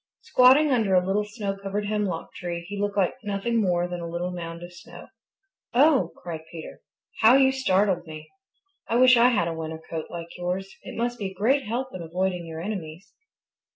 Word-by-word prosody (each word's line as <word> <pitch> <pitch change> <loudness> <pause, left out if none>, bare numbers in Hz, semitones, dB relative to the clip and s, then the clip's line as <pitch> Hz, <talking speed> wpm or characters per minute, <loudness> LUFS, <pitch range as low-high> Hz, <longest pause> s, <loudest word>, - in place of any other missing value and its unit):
Squatting 270 +4 +5
under 220 -7 +2
a 180 0 +3
little 200 +2 +1
snow 210 -2 -4
covered 200 +1 -4
hemlock 205 -5 -2
tree 170 -1 -5
he 205 - -6
looked 205 0 -2
like 190 -3 +2
nothing 210 +3 0
more 175 -3 +1
than 175 0 -5
a 170 - -5
little 175 +2 -3
mound 170 -1 -6
of 175 0 -10
snow. 175 - -13 0.7
"Oh!" 280 +1 +4
cried 165 -2 -6
Peter. 165 -2 -9 0.4
"How 230 +3 +7
you 265 -1 +5
startled 190 -8 +1
me! 155 -1 -10 0.6
I 230 - -1
wish 255 +1 +7
I 235 +1 +6
had 205 -9 +1
a 165 - -2
winter 160 0 -5
coat 160 -1 -4
like 170 0 -8
yours. 185 +2 -3
It - - -9
must 240 +1 -2
be 200 - -2
a - - -12
great 255 +6 +1
help 250 +4 -2
in 185 - -6
avoiding 180 +1 -2
your 160 0 -6
enemies." 180 -2 -6
195 Hz, 195 wpm, -25 LUFS, 175-225 Hz, 0.7 s, How